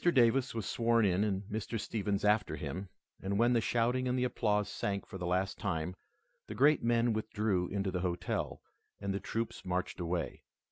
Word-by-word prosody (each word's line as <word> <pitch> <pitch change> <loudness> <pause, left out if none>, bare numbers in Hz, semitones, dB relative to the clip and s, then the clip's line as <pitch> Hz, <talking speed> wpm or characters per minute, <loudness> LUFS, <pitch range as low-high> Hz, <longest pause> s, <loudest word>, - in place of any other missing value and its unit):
Davis 130 -1 +3
was 110 -3 -2
sworn 115 0 +3
in 95 +1 +3
and 100 -2 0
Mr. 110 +2 -3
Stephens 105 -2 -1
after 105 +1 +3
him, 95 +1 -5 0.3
and 100 +1 -1
when 120 +3 +4
the 115 - +3
shouting 120 +3 +1
and 125 0 +1
applause 105 -4 +1
sank 100 0 -2
for 95 - -8
the 85 - -2
last 95 +2 0
time, 90 -2 -2 0.5
the 105 - -6
great 145 +6 +5
men 120 0 +3
withdrew 105 -4 0
into 95 0 -1
the 90 - -1
hotel, 90 -1 -2 0.4
and 100 -1 -2
the 100 - -1
troops 115 +2 -3
marched 90 0 -2
away. 85 -1 -2
105 Hz, 180 wpm, -33 LUFS, 95-115 Hz, 0.5 s, great